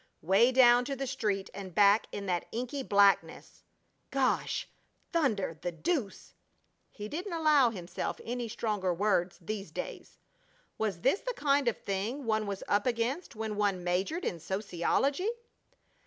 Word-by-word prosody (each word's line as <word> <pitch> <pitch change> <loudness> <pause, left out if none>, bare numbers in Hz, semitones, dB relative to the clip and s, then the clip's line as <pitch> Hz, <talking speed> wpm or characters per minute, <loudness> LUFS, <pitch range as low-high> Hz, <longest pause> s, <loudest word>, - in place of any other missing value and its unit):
Way 195 +9 +5
down 245 -1 +6
to 275 - -3
the 270 +1 -3
street 205 -6 -2
and 190 -3 -8
back 205 +1 +5
in 200 - -5
that 175 -3 -1
inky 250 +4 -3
blackness! 200 -5 +2 0.5
"Gosh! 265 -2 0 0.5
Thunder! 215 - 0
The 175 - -2
deuce!" 245 - -3 0.6
(He 210 -1 -7
didn't 350 - -5
allow 305 -6 +4
himself 180 -5 -5
any 240 0 -3
stronger 210 -4 -1
words 190 -2 +1
these 200 +3 -5
days.) - - -7 0.6
Was 200 -6 -1
this 270 - +3
the - - -4
kind 285 -2 +2
of 235 - +1
thing 215 +8 -3
one 220 -1 0
was 200 -1 -4
up 205 +4 +2
against 245 +7 -1
when 215 -1 -4
one 200 -3 0
majored 190 - -1
in 170 - -2
sociology? 200 - 0
215 Hz, 145 wpm, -30 LUFS, 195-265 Hz, 0.6 s, down